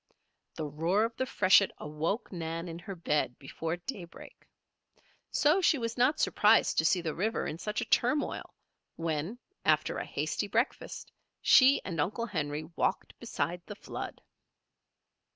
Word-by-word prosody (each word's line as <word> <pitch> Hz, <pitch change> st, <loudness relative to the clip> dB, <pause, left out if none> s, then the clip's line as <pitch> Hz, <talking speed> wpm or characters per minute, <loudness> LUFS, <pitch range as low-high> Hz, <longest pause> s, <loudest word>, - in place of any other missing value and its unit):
The 155 Hz, -, -3 dB
roar 165 Hz, +8 st, +1 dB
of 230 Hz, 0 st, -2 dB
the 260 Hz, -, -1 dB
freshet 200 Hz, -3 st, +5 dB
awoke 160 Hz, +9 st, -3 dB
Nan 165 Hz, -1 st, -4 dB
in 165 Hz, 0 st, -6 dB
her 195 Hz, +3 st, -7 dB
bed 150 Hz, -7 st, 0 dB
before 160 Hz, +4 st, -4 dB
daybreak. 175 Hz, -3 st, -9 dB, 0.8 s
So 310 Hz, +6 st, +3 dB
she 335 Hz, -4 st, +4 dB
was 230 Hz, -2 st, -3 dB
not 260 Hz, +5 st, +3 dB
surprised 215 Hz, +2 st, +4 dB
to 160 Hz, -, +2 dB
see 175 Hz, +2 st, +3 dB
the 160 Hz, -2 st, -3 dB
river 215 Hz, +6 st, -1 dB
in 160 Hz, -, -4 dB
such 210 Hz, +2 st, -2 dB
a -, -, -2 dB
turmoil 290 Hz, +5 st, +1 dB, 0.4 s
when, 165 Hz, +6 st, -2 dB, 0.3 s
after -, -, +2 dB
a -, -, -4 dB
hasty -, -, -2 dB
breakfast, -, -, -2 dB, 0.3 s
she 275 Hz, -1 st, +6 dB
and 165 Hz, -5 st, -1 dB
Uncle 215 Hz, +9 st, -1 dB
Henry 150 Hz, -7 st, -3 dB
walked -, -, -1 dB
beside 175 Hz, +1 st, -3 dB
the 205 Hz, -, -7 dB
flood. -, -, -7 dB
180 Hz, 150 wpm, -30 LUFS, 160-230 Hz, 0.8 s, she